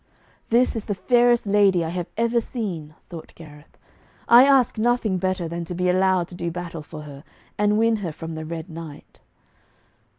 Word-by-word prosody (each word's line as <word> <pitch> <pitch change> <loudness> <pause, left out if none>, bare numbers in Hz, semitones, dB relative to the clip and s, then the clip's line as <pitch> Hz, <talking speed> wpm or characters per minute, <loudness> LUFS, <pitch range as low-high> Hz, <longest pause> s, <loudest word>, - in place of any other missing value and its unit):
'This 240 +2 +3
is 215 - -5
the 205 - -2
fairest 240 +3 +3
lady 200 -4 +3
I - - -3
have 175 0 -4
ever 235 +1 +1
seen,' 175 - -5
thought 165 -3 -10
Gareth. 150 -2 -15 0.5
'I 240 +3 +8
ask 270 -5 +3
nothing 225 -4 +1
better 185 -2 -1
than 170 +1 -5
to 175 - -6
be 180 +1 0
allowed 185 -1 +2
to - - -12
do 170 -1 -4
battle 170 -1 -6
for 150 +1 -10
her, 145 -1 -11 0.3
and 210 0 +1
win 225 0 +2
her 185 -6 -4
from 160 +2 -8
the 160 0 -6
Red 160 +1 -6
Knight.' 160 -3 -11
180 Hz, 185 wpm, -23 LUFS, 165-220 Hz, 0.5 s, I